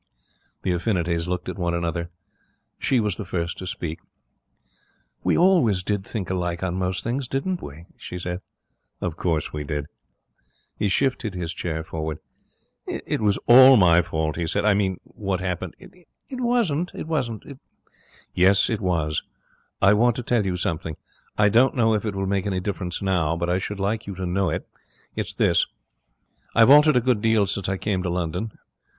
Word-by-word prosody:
The 95 - 0
affinities 85 -3 0
looked 90 0 -3
at - - -5
one 85 -1 0
another. 85 0 -2 0.7
She 130 - +2
was 105 -5 0
the - - -4
first 85 -1 -3
to 95 - -6
speak. 85 -3 -4 1.2
'We - - +2
always 160 - +4
did 100 0 -1
think 95 -3 -4
alike 90 -1 -2
on 90 -2 -1
most 90 0 -1
things, 125 +3 -2
didn't 170 +8 -2
we?' 75 +4 -9
she 90 - -7
said. 90 0 -4 0.6
'Of 85 -4 -3
course 80 -3 -1
we 75 -1 -3
did.' 75 -1 -3 0.9
He 105 - 0
shifted 120 -2 0
his 85 -2 -3
chair 80 -3 -3
forward. 80 -1 -4 0.7
'It - - -3
was 105 -2 +3
all 130 +2 +9
my 90 -3 +6
fault,' 80 -2 -2
he 85 -1 -1
said. 80 - 0
'I 105 - +5
mean, 95 -2 0
what 95 -3 -3
happened.' 90 -1 -3
'It 180 -2 -17 0.3
wasn't. 205 - +1
It 135 -4 -4 0.3
' - - -30
'Yes, 95 +4 +4
it 110 - -1
was. 80 -5 0 0.6
I 100 +1 +7
want 120 +2 +3
to 125 - -4
tell 115 -4 +1
you 90 -1 -1
something. 80 -2 -3 0.4
I 105 - +5
don't 120 +5 +4
know 115 -3 +3
if 110 +1 -1
it 100 - -3
will 95 0 -1
make 100 +1 0
any 95 -2 -1
difference 90 -1 -4
now, 85 -4 +1
but 85 +1 -1
I 90 - +2
should 100 +1 -5
like 105 +3 -1
you 100 - -5
to 95 0 -4
know 90 +1 0
it. - - -3 0.5
It's - - -4
this. - - +3 0.9
I've 115 +3 +7
altered 150 -1 +7
a - - +4
good 120 -3 +1
deal 110 -2 +3
since 100 0 -2
I 95 - -1
came 95 -2 -1
to 90 - -2
London. 90 +5 -2
95 Hz, 180 wpm, -24 LUFS, 85-115 Hz, 1.2 s, all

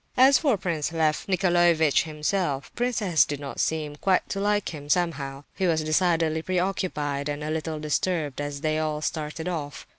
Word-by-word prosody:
As 265 +2 +7
for 275 -9 +2
Prince 170 -4 -2
Lef 160 -2 0
Nicolaievitch 175 -6 +3
himself, 150 -2 -2
Prince 245 -2 -1
S. 175 -5 +4
did 145 -1 -4
not 140 -2 -7
seem 155 -2 -1
quite 190 +2 +1
to 195 - -2
like 205 0 +1
him, 145 -2 -9
somehow. 145 -5 -1
He 190 - 0
was 160 -2 +1
decidedly 160 -1 +1
preoccupied 170 -6 -1
and 145 0 -3
a 155 - -3
little 160 0 -3
disturbed 150 -1 -1
as 145 -1 -4
they 155 0 0
all 155 -1 -2
started 155 +2 -3
off. 150 -5 -4
160 Hz, 175 wpm, -26 LUFS, 150-180 Hz, -, As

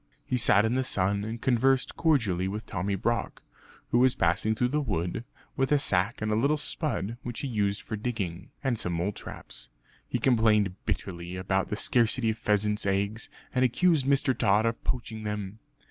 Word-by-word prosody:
He - - -1
sat 105 -3 +4
in 110 - +1
the 130 +1 +1
sun, 100 -3 +1
and 110 +2 -5
conversed 130 +2 +2
cordially 110 - +1
with 105 +3 -4
Tommy 100 +1 -2
Brock, 115 +5 -2 0.5
who 120 - +4
was 130 0 +4
passing 100 +6 +2
through 125 +2 +1
the 150 +3 0
wood 100 - -2 0.3
with 135 0 0
a 150 - +6
sack 100 -4 +1
and 110 - 0
a - - +2
little 140 +7 +2
spud 120 - -2
which 120 -1 -5
he 140 - -2
used 100 -4 -1
for 110 - -4
digging, 100 -6 -4
and 125 -5 0
some 90 -5 -1
mole 85 +4 0
traps. - - -10 0.4
He - - -1
complained 110 -6 +3
bitterly 85 -1 -3
about 95 +1 -1
the - - -1
scarcity 115 +2 +2
of 110 - -7
pheasants' 105 0 +1
eggs, 100 +3 -1 0.2
and 130 -1 +2
accused 145 +2 +3
Mr. 135 -2 +3
Tod 105 -1 +3
of 115 0 -1
poaching 115 -3 -3
them. 105 -1 -4
110 Hz, 185 wpm, -28 LUFS, 100-125 Hz, 0.5 s, a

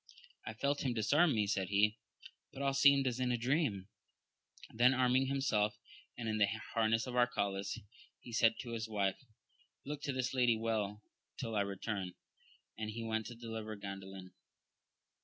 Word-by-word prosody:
I - - -4
felt 140 +1 0
him 125 -3 0
disarm 145 +8 +3
me, 105 -1 +2
said 100 -2 0
he, 105 +1 +3 0.5
but 140 - -6
all 135 0 +2
seemed 140 0 +6
as 125 -1 -1
in 125 -1 +1
a 120 - +1
dream. 120 - 0 0.9
Then 125 +3 +5
arming 130 +1 +3
himself 110 -7 +1 0.4
in 110 -2 -2
the 100 - +5 0.3
harness 115 0 +2
of 125 - -6
Arcalaus, 100 -5 0 0.4
he 120 - -11
said 115 0 +4
to 120 - -7
his 115 -1 -3
wife, 100 -3 0 0.7
look 145 +1 -5
to 140 - -2
this 130 -1 -1
lady 120 -3 +3
well 110 -2 -2 0.3
till 115 -3 -4
I 105 - +3
return; 100 -1 -3 0.7
and 110 -1 -3
he 115 +2 -5
went 110 -1 -2
to 120 - -8
deliver 110 -2 -6
Gan 100 -1 -6
dalin. 95 -1 -10
115 Hz, 165 wpm, -35 LUFS, 105-125 Hz, 0.9 s, seemed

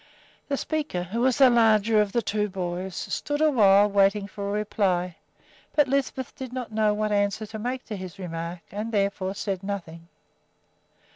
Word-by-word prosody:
The 280 - -1
speaker, 295 - -2
who 210 +7 -3
was 255 0 +3
the 265 -3 +7
larger 220 -2 +4
of 205 -1 -1
the 235 +2 0
two 210 +1 -1
boys, 185 0 -4
stood 290 +8 -3
awhile 210 -10 +5
waiting 200 0 +3
for 200 0 -6
a - - -2
reply; 190 -4 0 0.6
but 295 -2 +4
Lisbeth 265 -1 -2
did 260 -3 -7
not 250 -3 -5
know 215 -1 +2
what 215 0 -1
answer 205 +1 0
to 220 +1 -8
make 250 +3 -3
to 215 - -5
his 185 -3 -8
remark 170 -1 -5
and 210 +3 -4
therefore 200 -2 -1
said 195 -3 -3
nothing. 170 -5 -6
210 Hz, 170 wpm, -26 LUFS, 195-235 Hz, 0.6 s, the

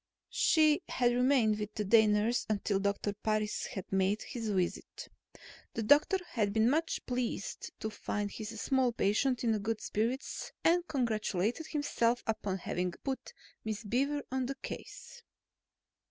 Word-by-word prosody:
She 310 -2 +4
had 245 -1 +2
remained 245 -4 +3
with 210 0 -5
the 210 - -1
day 220 +2 +6
nurse 210 +3 +1
until 205 -1 0
Doctor 200 +1 -1
Parris 215 0 -1
had 190 - -6
made 195 +2 +1
his 230 -3 -4
visit. 185 -3 -2 0.7
The 225 - -1
doctor 290 - +5
had 205 -4 0
been 220 +3 +4
much 325 +3 0
pleased 250 - -3
to 220 - -2
find 205 -1 -3
his 225 0 -6
small 260 -1 +2
patient 235 +5 +1
in 225 -2 +2
good 220 +2 -2
spirits 235 +6 -2
and 350 +1 +3
congratulated 230 - -1
himself 245 -5 0
upon 210 -3 -1
having 180 0 -2
put 270 -1 -4 0.3
Miss 215 0 -4
Beaver 275 +7 0
on 260 -1 -1
the 275 - -3
case. 475 - -9
225 Hz, 145 wpm, -32 LUFS, 210-260 Hz, 0.7 s, day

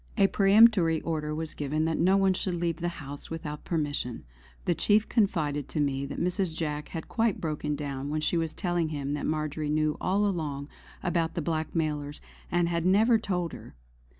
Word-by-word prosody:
A 200 - +6
peremptory 195 -4 +5
order 150 -2 -2
was 160 0 -4
given 150 +2 -1
that 160 -1 0
no 185 +3 +4
one 195 -1 +4
should 185 -1 -2
leave 170 -1 -1
the 175 - -2
house 145 -4 -7
without 155 -2 -5
permission. 145 - -2 0.4
The 175 - +3
chief 210 +5 +3
confided 155 - 0
to 155 - -3
me 140 -1 0
that 140 - -5
Mrs. 180 -2 0
Jack 150 -2 -2
had 165 -2 -6
quite 225 -3 +1
broken 150 -2 -2
down 140 -1 -4
when 155 +1 -1
she 155 - +1
was 165 -2 0
telling 175 -4 -1
him 145 -2 -3
that 145 - -2
Marjory 155 -1 -2
knew 155 0 +1
all 200 +3 +2
along 150 -7 -2 0.3
about 170 -3 0
the 170 - -1
blackmailers 155 -2 -2 0.3
and 175 0 +2
had 170 -1 0
never 220 +6 +4
told 180 -6 -2
her. - - -11
160 Hz, 185 wpm, -28 LUFS, 150-180 Hz, 0.4 s, A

